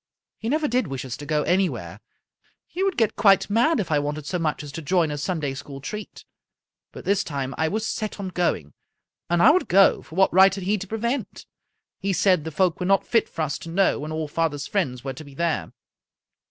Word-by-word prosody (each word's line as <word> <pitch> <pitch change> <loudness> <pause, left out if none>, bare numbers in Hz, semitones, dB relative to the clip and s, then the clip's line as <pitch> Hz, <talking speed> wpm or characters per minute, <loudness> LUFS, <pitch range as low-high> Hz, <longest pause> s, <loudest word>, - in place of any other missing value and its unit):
He 225 - -3
never 305 +2 +1
did 245 -5 0
wish 135 -2 -5
us 125 - -5
to 145 - -9
go 150 -1 +1
anywhere. 185 +1 -1 0.7
He 365 - -6
would 390 -3 0
get 220 -2 +2
quite 195 -1 +4
mad 240 +8 +3
if 180 -5 -3
I 150 - +3
wanted 145 0 -3
so 180 +3 -2
much 155 -2 -1
as 145 - -8
to 165 - -6
join 165 0 +1
a 145 - -3
Sun 165 +2 -2
day 140 -2 -2
School 135 0 -8
treat. 210 +10 -7 0.7
But - - -11
this 200 0 +2
time 135 -3 -4
I 160 - 0
was 215 +5 -2
set 215 -1 -4
on 195 -2 -4
going, 170 - -1 0.6
and 170 0 +3
I - - +9
would 370 - +1
go, 195 +2 +5
for 160 - -13
what 190 -1 +3
right 190 +1 +6
had 195 - -6
he 205 +3 0
to 195 - -7
prevent? 235 +6 -3 0.5
He 195 0 -1
said 180 -3 +3
the - - -2
folk 170 +2 +1
were 180 - -2
not 195 0 +3
fit 230 -2 +1
for 160 - -3
us 145 -1 -3
to 165 - -9
know, 190 +4 +2
when 150 +2 -5
all 155 -1 -3
father's 145 -2 -1
friends 130 -12 -2
were 135 -1 -4
to 145 - -10
be 140 -2 -14
there. 160 - -1
175 Hz, 235 wpm, -24 LUFS, 150-200 Hz, 0.7 s, I